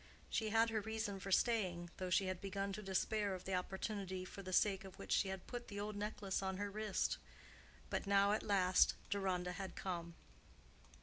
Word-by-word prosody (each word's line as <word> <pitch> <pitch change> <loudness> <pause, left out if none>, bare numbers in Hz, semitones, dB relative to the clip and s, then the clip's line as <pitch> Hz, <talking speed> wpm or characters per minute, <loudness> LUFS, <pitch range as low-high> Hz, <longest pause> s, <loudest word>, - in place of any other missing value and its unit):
She 220 -1 +1
had 225 +1 +4
her 220 -1 +1
reason 220 -2 -2
for 195 +1 -5
staying, 185 -6 +2
though 185 -1 -2
she 190 +2 +4
had 185 -1 -2
begun 195 0 -2
to 210 - -4
despair 200 +1 +1
of 185 - -9
the 190 - -2
opportunity 190 0 -2
for 200 - -8
the 185 -1 -6
sake 195 +1 +3
of 190 -1 -10
which - - -7
she - - +4
had 190 -1 -4
put 245 0 -5
the 200 -1 -5
old 210 +1 -3
necklace 205 -2 -2
on 190 -1 -1
her 205 0 -2
wrist. 210 -2 0 0.7
But - - -1
now 200 0 +5
at 215 - +2
last 185 -3 +4 0.2
Deronda 185 -3 0
had 190 +1 -5
come. 170 -3 -3
195 Hz, 195 wpm, -39 LUFS, 185-210 Hz, 0.7 s, now